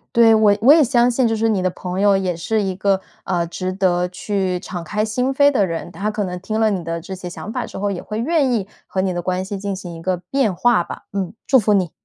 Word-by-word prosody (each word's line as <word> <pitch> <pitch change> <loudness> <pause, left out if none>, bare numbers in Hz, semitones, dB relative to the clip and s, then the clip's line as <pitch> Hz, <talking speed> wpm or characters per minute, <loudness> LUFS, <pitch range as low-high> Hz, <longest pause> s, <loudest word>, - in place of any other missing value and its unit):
对， 230 -1 +7
我 215 -2 +4
我 260 +6 +8
也 320 - +6
相 245 -2 +3
信 245 0 +2
就 225 - 0
是 225 +1 +1
你 205 -4 +1
的 185 - +1
朋 180 +1 -5
友 200 0 +4
也 190 -2 0
是 215 +6 0
一 190 -1 -1
个， 195 0 +1 0.2
呃， 175 -2 0
值 185 +2 -4
得 180 -2 +1
去 190 0 -2
敞 180 -3 -6
开 210 +6 -2
心 250 +5 -1
扉 285 +1 +5
的 205 -8 +2
人， 165 0 -5
他 205 +4 -3
可 210 -1 -2
能 180 -2 -4
听 215 +4 -3
了 220 -1 +3
你 190 -3 -1
的 165 0 -3
这 190 +3 -8
些 180 -1 -7
想 200 +4 -7
法 - - -3
之 - - -9
后， 200 +1 -1
也 185 - -4
会 215 - -6
愿 280 0 +2
意 210 -5 0 0.2
和 190 - -1
你 190 0 0
的 175 -1 -3
关 185 +1 -1
系 195 +1 -5
进 200 0 -3
行 180 -2 -8
一 165 - -9
个 185 +2 0
变 200 +4 -1
化 225 -3 +3
吧。 - - -8
嗯， 195 -2 -3
祝 265 - +5
福 210 -1 +2
你。 185 -4 +2
195 Hz, 295 characters per minute, -20 LUFS, 180-220 Hz, 0.2 s, 我